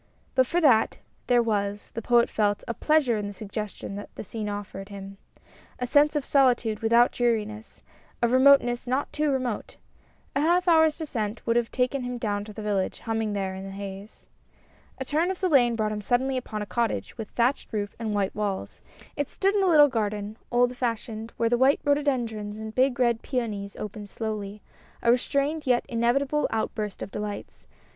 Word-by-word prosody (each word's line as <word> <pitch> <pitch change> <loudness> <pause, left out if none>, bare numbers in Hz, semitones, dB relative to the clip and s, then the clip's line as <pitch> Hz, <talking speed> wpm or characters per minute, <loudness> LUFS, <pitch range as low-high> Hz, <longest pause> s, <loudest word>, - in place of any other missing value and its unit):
But 260 -1 +3
for 345 - +1
that, 250 -8 +4 0.3
there 245 -1 +4
was, 205 -2 -2
the 230 - -4
Poet 235 +1 +4
felt, 205 -2 0
a 235 - -1
pleasure 280 -3 +2
in 205 -1 -3
the 205 - -6
suggestions 200 -1 -6
that 205 - -8
the - - -6
scene 215 +1 -5
offered 200 -1 -6
him. 195 -1 -9 0.6
A 250 - -2
sense 290 +4 +4
of 290 -2 0
solitude 245 -6 +3
without 235 +2 +4
dreariness, 220 -2 -2 0.4
of 235 -1 +2
remoteness 255 -2 +5
not 260 +3 -1
too 300 0 +1
remote. 255 -5 -2 0.6
A 280 - +2
half 350 +4 +2
hour's 320 -2 +5
descent 230 -9 -4
would 230 - +1
have 235 -1 +1
taken 255 +2 0
him 245 0 -4
down 205 -3 -2
to 215 - -9
the 215 +1 -8
village, 200 -3 -1
humming 225 -2 -1
there 195 -2 -2
in 190 0 -7
the 195 - -7
haze. 195 +1 -8 0.7
A 265 - -4
turn 315 +6 +1
of 380 - -3
the 370 - +1
lane 245 -7 +4
brought 215 -1 0
him 210 0 -3
suddenly 260 +5 +1
upon 215 -4 -3
a - - -6
cottage, 235 +2 -2
with 220 -3 -6
thatched 245 +4 0
roof 205 -2 -3
and 225 -2 -2
white 200 -2 0
walls; 205 -2 -3 0.3
it 290 -1 -2
stood 390 +1 +1
in 410 - +2
a 380 - +3
little 300 -3 +7
garden, 210 -4 -2
old 245 +1 +2
fashioned, 230 -2 -3
where 230 - +2
the 240 +1 +2
white 265 +2 +4
rhododendrons 240 -8 0
and 220 0 -6
big 255 0 +2
red 235 -2 +2
peonies 210 -6 -3
opened 210 0 -7
slowly, 210 -2 -5 0.4
a 235 - +5
restrained 280 +5 +1
and 300 -3 -11
yet 245 -1 +3
inevitable 265 +5 +1
outburst 215 -2 -3
of - - -8
delights. 210 -1 -6
230 Hz, 190 wpm, -26 LUFS, 210-260 Hz, 0.7 s, little